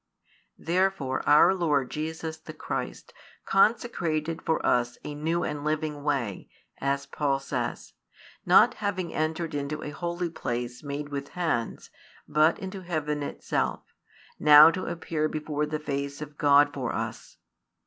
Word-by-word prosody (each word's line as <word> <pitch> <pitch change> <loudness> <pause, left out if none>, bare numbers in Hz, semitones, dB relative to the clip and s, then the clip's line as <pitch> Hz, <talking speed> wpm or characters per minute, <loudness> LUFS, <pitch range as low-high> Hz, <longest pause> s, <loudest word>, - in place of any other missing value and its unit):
Therefore 175 -6 0
our 150 +5 +7
Lord 150 -8 0
Jesus 160 +1 -4
the - - -10
Christ - - -5 0.3
consecrated 170 -7 +1
for 160 - -1
us 120 0 +1
a 150 - -5
new 165 +4 -1
and 150 -1 -3
living 155 -1 -2
way, 135 -9 -2 0.3
as 140 0 -1
Paul 140 -2 0
says; 135 - -4 0.5
not - - +6
having 185 -4 -2
entered 160 +1 -2
into 145 +1 -3
a 150 - -5
holy 170 +2 -3
place 120 -4 -4
made 145 0 -5
with 140 -1 -4
hands, 160 -11 -3 0.4
but 155 +2 +3
into 190 0 -7
heaven 155 -4 -2
itself, 145 - -2 0.6
now 150 +1 +9
to 185 +2 -4
appear 160 -2 -2
before 150 -1 -2
the 155 +1 -2
face 140 -2 -4
of 150 -1 -8
God 145 0 +5
for 130 -4 -3
us. - - -5
150 Hz, 140 wpm, -27 LUFS, 145-165 Hz, 0.6 s, now